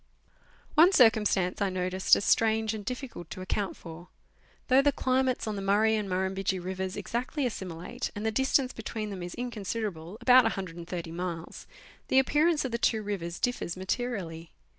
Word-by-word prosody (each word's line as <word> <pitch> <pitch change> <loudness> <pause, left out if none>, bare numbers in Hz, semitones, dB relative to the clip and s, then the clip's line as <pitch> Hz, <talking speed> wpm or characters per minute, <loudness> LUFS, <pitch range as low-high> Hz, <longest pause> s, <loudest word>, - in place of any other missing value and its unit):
241 315 - +9
One 385 - 0
circumstance 210 - +3
I 200 - +2
noticed 185 0 +3
as - - -2
strange 220 -1 +2
and 215 -2 -5
difficult 250 - -6
to 185 - -7
account 195 +1 -2
for. 170 +1 -10 0.6
Though 260 +1 +6
the 285 +1 +3
climates 255 -2 0
on 215 -1 -3
the 200 - -4
Murray 210 +3 +3
and 210 -2 -2
Muirumbidgee 190 +1 -1
rivers 185 +1 -4
exactly 255 +4 -2
assimilate, 180 -7 -4
and 205 +1 -4
the 220 - +1
distance 265 +2 +1
between 215 -1 -5
them 190 -2 -6
is 175 0 -6
inconsiderable 210 -6 -4
about 250 +1 +6
130 175 -4 -4
miles 170 -1 -6 0.4
the - - +2
appearance 295 +3 +3
of 260 - -3
the 235 - -2
two 220 -2 +1
rivers 175 -5 -4
differs 245 -8 -2
materially. 185 -5 -3
205 Hz, 165 wpm, -29 LUFS, 185-245 Hz, 0.6 s, 241